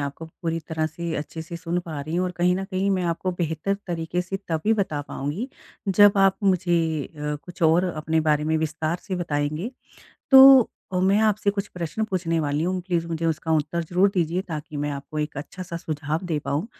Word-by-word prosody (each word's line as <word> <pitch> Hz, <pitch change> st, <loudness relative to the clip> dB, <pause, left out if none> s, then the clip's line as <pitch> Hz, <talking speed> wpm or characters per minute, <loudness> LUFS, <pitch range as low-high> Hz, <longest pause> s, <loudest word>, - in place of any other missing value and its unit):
आपको 140 Hz, +3 st, -4 dB, 0.2 s
पूरी 165 Hz, 0 st, -1 dB
तरह 160 Hz, -1 st, 0 dB
से 165 Hz, +1 st, -4 dB
अच्छे 160 Hz, +2 st, -5 dB
से 170 Hz, +1 st, -7 dB
सुन 170 Hz, +1 st, -2 dB
पा 155 Hz, -3 st, -4 dB
रही 155 Hz, +4 st, -5 dB
हूँ 180 Hz, -, +1 dB
और 180 Hz, -, -1 dB
कहीं 180 Hz, +1 st, +3 dB
न 195 Hz, -, -3 dB
कहीं 190 Hz, 0 st, -1 dB
मैं 190 Hz, -2 st, +1 dB
आपको 170 Hz, +2 st, -1 dB
बेहतर 160 Hz, +3 st, -1 dB
तरीके 170 Hz, 0 st, -2 dB
से 185 Hz, +2 st, -4 dB
तभी 165 Hz, +7 st, +1 dB
बता 190 Hz, -8 st, -1 dB
पाऊँगी, 155 Hz, -, -3 dB, 0.4 s
जब 205 Hz, +1 st, +7 dB
आप 195 Hz, -1 st, +4 dB
मुझे 170 Hz, -5 st, +1 dB
अ, 150 Hz, -2 st, -4 dB
कुछ 175 Hz, +1 st, -9 dB
और 165 Hz, +3 st, +5 dB
अपने 160 Hz, -2 st, 0 dB
बारे 150 Hz, -1 st, +2 dB
में 160 Hz, +1 st, +1 dB
विस्तार 160 Hz, +1 st, -1 dB
से 190 Hz, -3 st, -4 dB
बताएँगे। 155 Hz, +4 st, -2 dB, 0.6 s
तो, 265 Hz, -2 st, +9 dB, 0.2 s
मैं 190 Hz, +3 st, +3 dB
आपसे 215 Hz, -1 st, +2 dB
कुछ 200 Hz, 0 st, -3 dB
प्रश्न 175 Hz, +4 st, -3 dB
पूछने 175 Hz, -5 st, -1 dB
वाली 145 Hz, 0 st, 0 dB
हूँ, 185 Hz, +1 st, -1 dB
प्लीज 170 Hz, -3 st, 0 dB
मुझे 165 Hz, 0 st, -2 dB
उसका 160 Hz, 0 st, -1 dB
उत्तर 155 Hz, +3 st, -1 dB
ज़रूर 180 Hz, +4 st, +3 dB
दीजिए, 175 Hz, 0 st, +1 dB
ताकि 155 Hz, -4 st, -6 dB
मैं 145 Hz, +1 st, -1 dB
आपको 140 Hz, +2 st, -6 dB
एक 150 Hz, -1 st, -3 dB
अच्छा-सा 170 Hz, +4 st, -6 dB
सुझाव 155 Hz, -1 st, -3 dB
दे 160 Hz, -3 st, 0 dB
पाऊँ। 145 Hz, +9 st, -1 dB
170 Hz, 200 wpm, -24 LUFS, 155-185 Hz, 0.6 s, तो